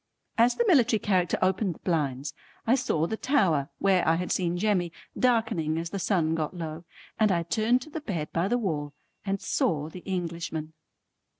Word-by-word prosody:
As 235 +2 +4
the 475 - +1
military 250 - +5
character 185 -4 +1
opened 190 -1 +1
the - - -17
blinds 145 -5 -1 0.3
I 230 - +4
saw 245 - +1
the 220 - -2
tower 180 - +2
where 190 -2 +3
I 160 - +5
had 180 +2 -3
seen 175 -1 0
Jemmy, 180 -3 +1 0.2
darkening 220 -11 +1
as 165 0 -3
the 200 - -3
sun 170 -5 +1
got 165 +2 -2
low, 165 0 -5 0.3
and 215 -2 +4
I 170 -2 +1
turned 225 +8 +1
to 310 - -14
the 320 - -5
bed 170 - -3
by 170 +3 +1
the 240 +4 +2
wall 150 -10 -2 0.3
and 195 0 0
saw 155 -4 0
the 180 - -9
Englishman. 170 -4 -4
180 Hz, 185 wpm, -27 LUFS, 160-215 Hz, 0.3 s, military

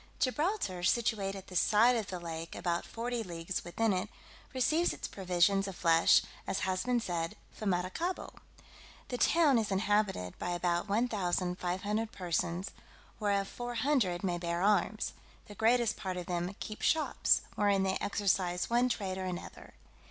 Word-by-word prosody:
Gibraltar, 285 - 0
situate 200 0 +1
at 195 -1 -8
the 185 - -11
side 225 +7 +5
of 220 -4 -2
the 180 - -5
lake 165 -1 -6
about 170 -1 -1
forty 240 +1 -3
leagues 175 -2 -4
within 210 +5 0
it, 185 +3 -2 0.4
receives 310 +6 +2
its - - -5
provisions 195 +1 +2
of 195 - -6
flesh, 165 -1 +5 0.2
as - - -1
has 185 0 -1
been 250 -1 +2
said, 170 -6 -3 0.2
from 215 - -3
Maracaibo. 190 - -2 0.8
The 245 - -3
town 305 -7 +4
is 220 - -1
inhabited 195 - 0
by 175 - -2
about 175 +1 0
1,500 200 -1 -1
persons, 175 0 -2 0.5
whereof 200 -2 +1
four 240 +2 -6
hundred 230 -9 +1
may 175 -2 0
bear 170 +1 -1
arms; 210 +1 +1 0.3
the 205 - -11
greatest 225 +2 +2
part 185 -1 -4
of 180 - -4
them 175 +2 -2
keep 215 - -6
shops, 315 -1 +3
wherein 200 -2 +2
they 190 0 0
exercise 190 -2 0
one 245 +1 +3
trade 190 -5 -2
or 185 - -3
another. 180 -1 -7
195 Hz, 155 wpm, -32 LUFS, 180-225 Hz, 0.8 s, side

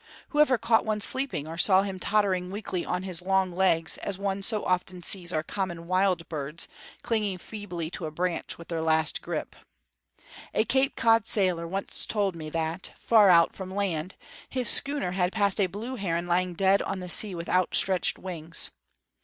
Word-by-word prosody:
Who 295 - -2
ever 270 -4 +5
caught 230 0 +2
one 215 -1 -1
sleeping, 260 - +1
or 165 +1 -7
saw 190 0 +5
him 195 -2 -5
tottering 190 -3 +1
weakly 190 -3 -4
on 180 +1 -3
his 180 -2 -4
long 190 0 +1
legs, 165 -4 +2
as 200 -2 -4
one 200 0 -2
so 210 +1 0
often 180 0 -1
sees 175 -2 +4
our 155 -2 -1
common 175 -2 -4
wild 185 -1 +1
birds 150 +1 -4 0.4
clinging 210 -5 -1
feebly 180 -5 -6
to 165 - -4
a - - -7
branch 175 +2 -3
with 170 - -13
their 165 -2 -2
last 160 -1 +2
grip? - - -5 1.0
A 220 - +3
Cape 270 +2 +1
Cod 225 -1 +3
sailor 180 -5 +2
once 195 +3 -2
told 200 -4 -1
me 155 -2 -7
that, 165 +3 -2
far 215 -4 +5
out 170 -2 +5
from 190 0 -8
land, 185 -3 -2 0.3
his 255 -2 -1
schooner 280 -10 +1
had 180 0 0
passed 205 -2 +1
a 190 - +3
blue 225 +8 -6
heron 170 -4 -2
lying 175 0 0
dead 195 +2 +3
on 195 - -4
the 180 - -7
sea 190 +2 +2
with 170 0 -6
outstretched 185 0 +3
wings. 165 -3 -2
185 Hz, 185 wpm, -27 LUFS, 170-205 Hz, 1.0 s, ever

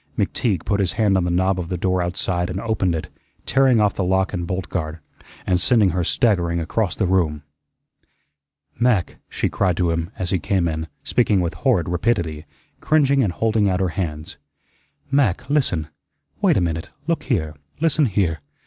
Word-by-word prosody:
McTeague 100 -9 0
put 100 - 0
his 95 -2 +1
hand 105 -3 +2
on 90 -2 +2
the - - 0
knob 95 +2 +1
of 85 -2 -4
the 90 - -2
door 90 +1 0
outside 90 0 -1
and 90 +1 -3
opened 100 -6 0
it, 80 - -4 0.4
tearing 135 -3 +4
off 105 -2 +3
the 95 - -2
lock 95 +2 +1
and 90 -2 -3
bolt 90 +1 -3
guard, 80 -2 -3 0.5
and 90 -1 +2
sending 110 -7 +3
her 90 +1 -1
staggering 85 -4 +1
across 90 +5 -1
the 105 - 0
room. 85 -5 +1 1.4
"Mac," 120 -7 +1
she - - -1
cried 90 -3 0
to 85 -2 +1
him, 85 0 -2
as 90 -1 -2
he 95 - +1
came 90 0 0
in, 80 0 -3 0.2
speaking 110 -5 +2
with 85 -2 -1
horrid 85 - +1
rapidity, 85 -4 -1 0.3
cringing 140 -3 +3
and 95 -6 0
holding 110 -1 +1
out 90 -1 0
her 95 -1 +1
hands, 80 -3 -4 0.7
"Mac, 130 -5 +1
listen. 95 - +1 0.5
Wait - - +4
a - - +2
minute 80 -1 -2 0.2
look - - 0
here 80 -1 -1 0.3
listen 155 -2 +2
here. 90 -6 0
95 Hz, 180 wpm, -21 LUFS, 85-105 Hz, 1.4 s, tearing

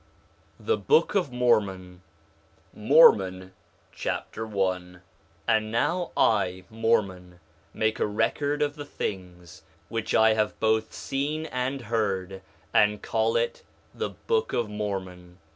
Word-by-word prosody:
THE 450 - 0
BOOK 460 +1 +3
OF 180 -9 0
MORMON 100 -7 0 0.7
Mormon 95 - +4 0.4
Chapter 110 0 -4
1 95 -3 -2
1:1 90 - -19 0.5
And 110 -1 +1
now 170 +9 0
I, 95 -4 +2
Mormon, 100 -6 -1 0.3
make 110 0 -1
a - - +1
record 145 +7 0
of 145 0 -2
the 145 - -7
things 90 - -6 0.3
which 115 -1 -2
I 110 0 +5
have 110 -1 -1
both 110 0 +1
seen 150 +3 -3
and 130 -1 -3
heard, 100 -4 -2 0.3
and 105 0 +3
call 115 0 0
it 115 0 -1 0.3
the - - -3
Book 460 -1 -2
of 120 - 0
Mormon. 95 -4 -5
110 Hz, 125 wpm, -26 LUFS, 95-125 Hz, 0.7 s, I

